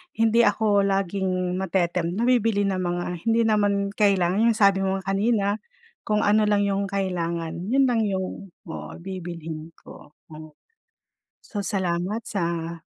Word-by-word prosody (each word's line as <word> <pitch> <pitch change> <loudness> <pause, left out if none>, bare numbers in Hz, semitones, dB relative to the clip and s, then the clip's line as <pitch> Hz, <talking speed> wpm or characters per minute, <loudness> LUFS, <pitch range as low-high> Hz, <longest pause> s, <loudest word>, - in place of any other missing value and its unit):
hindi 225 +1 +4
ako 205 0 +2
laging 185 -1 -1
mate-tempt 175 -2 0
na 225 - -1
bibili 230 -4 +2
ng 195 -2 0
mga 175 -1 -1 0.2
hindi 230 +1 +3
naman 205 -2 +1
kailangan, 200 0 +2
yung 230 - +3
sabi 200 -3 +4
mo 195 0 0
nga 195 0 -3
kanina, 205 +1 +1 0.6
kung 210 -1 +1
ano 210 +1 +3
lang 205 -1 +3
yung 200 0 0
kailangan 170 -3 -3
yun 270 +5 +3
lang 245 -3 +2
yung 190 0 -4 0.2
oo, 165 - -7
bibilhin 165 -4 -7
ko. 150 - -15 0.2
Hmm. 155 0 -11 0.9
So, 205 -2 -5
salamat 190 +3 -2
sa 170 -3 -3
195 Hz, 145 wpm, -24 LUFS, 175-210 Hz, 0.9 s, hindi